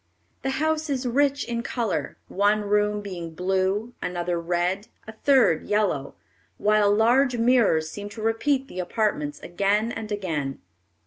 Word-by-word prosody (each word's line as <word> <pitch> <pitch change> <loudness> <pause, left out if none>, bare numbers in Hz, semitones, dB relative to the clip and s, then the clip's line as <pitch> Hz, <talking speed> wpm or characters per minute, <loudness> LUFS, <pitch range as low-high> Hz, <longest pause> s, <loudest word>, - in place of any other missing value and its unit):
The 270 - -2
house 315 0 0
is 265 -2 -1
rich 280 +3 +2
in 235 -1 -3
color, 235 -3 -2
one 205 +2 +2
room 210 0 +1
being 175 -5 -7
blue, 190 +6 0
another 175 -1 -2
red, 175 +4 -1 0.2
a - - -6
third 230 - +3
yellow, 205 -10 0 0.4
while 210 -1 +3
large 240 +4 +3
mirrors 230 -10 +3
seem 205 0 -7
to 215 +1 -9
repeat 265 +5 +1
the 185 - -8
apartments 175 -6 -1
again 200 +5 0
and 220 -2 -6
again. 160 -9 -3
210 Hz, 140 wpm, -25 LUFS, 180-235 Hz, 0.4 s, third